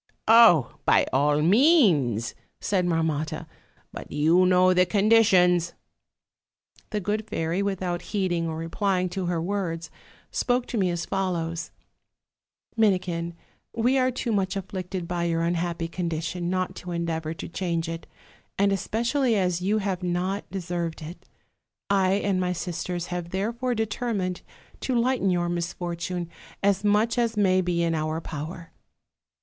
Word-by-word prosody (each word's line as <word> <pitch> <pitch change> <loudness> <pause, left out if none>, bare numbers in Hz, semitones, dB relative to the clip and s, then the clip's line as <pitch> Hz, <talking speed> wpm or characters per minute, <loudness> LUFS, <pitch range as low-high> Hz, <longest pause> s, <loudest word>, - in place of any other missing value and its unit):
'Oh! 220 - +6
by - - +4
all 145 +2 +3
means,' 175 - +4 0.3
said 185 -3 0
Marmotta, 160 -1 -1 0.5
'but - - -9
you 165 +5 +4
know 185 0 +5
the 180 0 +5
conditions.' 190 -5 +4 1.1
"The 210 - -2
good 210 +3 -2
fairy, 165 +4 -1
without 185 -3 -2
heeding 175 -5 -1
or 160 - -4
replying 180 +3 -1
to 180 0 -3
her 175 -1 0
words, 170 -3 -3 0.4
spoke 245 0 0
to 240 - -2
me 185 -2 +2
as 170 -1 -2
follows: 170 -3 -2 1.1
'Minikin, 180 -6 +1 0.4
we 245 +4 +2
are 255 0 +3
too 250 -1 -3
much 195 -2 0
afflicted 185 -2 -5
by 175 0 -1
your 165 -1 0
unhappy 170 0 -1
condition 170 0 -3
not 185 0 -1
to 180 - -7
endeavor 165 -2 -2
to - - -7
change 170 -2 -2
it, 165 0 -6 0.5
and 200 0 +3
especially 235 +6 0
as 180 -2 0
you 200 +4 +1
have 195 -3 -2
not 180 +3 -2
deserved 170 -3 -4
it. 165 +4 -10 0.6
I 190 -1 +3
and 195 -2 +1
my 180 0 0
sisters 175 0 -4
have 175 -1 -4
therefore 235 +7 -2
determined 215 -4 -2 0.4
to 260 - -1
lighten 245 -4 +1
your 175 -1 +1
misfortune 175 0 -3 0.4
as 200 0 +2
much 215 +3 +2
as 230 -2 0
may 185 -2 +3
be 175 -1 0
in 165 -1 +1
our 155 0 -1
power. 165 +2 -7
180 Hz, 140 wpm, -25 LUFS, 170-200 Hz, 1.1 s, Oh